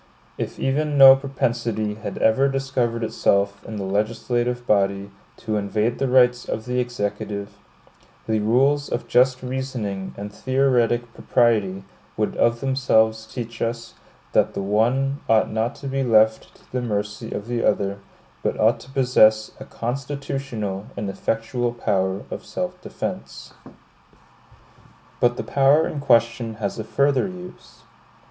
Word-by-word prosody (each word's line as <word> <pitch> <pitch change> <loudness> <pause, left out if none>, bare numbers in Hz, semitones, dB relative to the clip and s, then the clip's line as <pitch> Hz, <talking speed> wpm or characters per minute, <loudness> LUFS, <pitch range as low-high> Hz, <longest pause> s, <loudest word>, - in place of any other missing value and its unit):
If - - -5
even 145 +2 0
no 135 -1 +10
propensity 120 -5 -2
had 110 +2 -7
ever 120 +5 +3
discovered 130 -4 -1
itself 100 -2 +1
in 110 - -6
the 100 - -4
legislative 120 +5 -1
body 100 -1 +1 0.3
to 110 -2 -2
invade 105 +3 -1
the 135 - +1
rights 125 -1 +4
of 110 - -3
the 125 0 -1
Executive, 105 -4 -4 0.7
the 110 -1 +1
rules 135 +7 +2
of 120 - -3
just 125 +1 +3
reasoning 125 -7 -4
and 105 +1 -7
theoretic 120 -3 +1
propriety 105 -6 +1 0.3
would 105 0 -1
of 115 0 +2
themselves 110 -5 +2
teach 115 -2 -7
us, 115 0 -3 0.4
that - - +2
the - - -2
one 125 +7 +1
ought 110 -1 +3
not 110 +4 -1
to 140 - -8
be 135 0 -1
left 110 -3 +2
to - - -24
the 125 - -2
mercy 105 -3 -3
of 100 - -4
the 120 0 -2
other, 100 0 0 0.4
but - - -2
ought 110 +2 +3
to - - -14
possess 115 -5 +3
a - - -8
constitutional 125 -5 -4
and 100 -1 -3
effectual 120 +4 -2
power 95 -4 -1
of - - -5
self - - -5
defense. - - -6 1.7
But 120 0 +2
the - - -3
power 140 +3 +3
in 150 - -4
question 115 -3 +2
has 105 -1 -4
a - - -2
further 140 - +1
use. 180 -1 -11
115 Hz, 140 wpm, -23 LUFS, 105-130 Hz, 1.7 s, no